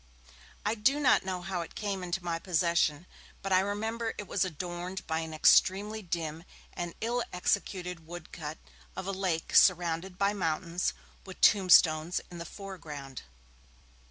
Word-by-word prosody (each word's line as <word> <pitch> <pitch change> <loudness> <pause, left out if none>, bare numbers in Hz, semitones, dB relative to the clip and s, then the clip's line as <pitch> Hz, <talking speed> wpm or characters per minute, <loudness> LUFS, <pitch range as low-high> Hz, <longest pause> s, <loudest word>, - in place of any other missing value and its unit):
I 210 - +2
do 255 +7 +2
not 270 -4 +4
know 185 -1 -4
how 180 -1 -2
it 165 - -9
came 200 -2 -3
into 180 +1 -3
my 170 -1 -2
possession, 170 -2 +1 0.4
but 195 -1 0
I 185 - +6
remember 220 +4 -2
it 205 - -5
was 195 - +1
adorned 180 +2 -5
by 160 0 -1
an 160 -1 -5
extremely 200 +7 +4
dim 165 -3 -4 0.3
and 175 -1 -5
ill 240 +2 0
executed 180 -2 -2
wood 175 -1 -9
cut 155 -1 -6 0.4
of - - -5
a 195 - -2
lake 185 -4 -2
surrounded 180 0 +4
by 200 +1 +2
mountains, 170 -1 -1 0.3
with 190 -1 -11
tombstones 170 -4 +5
in 175 - -8
the 170 - -5
foreground. 155 - -8
180 Hz, 155 wpm, -30 LUFS, 165-195 Hz, 0.4 s, I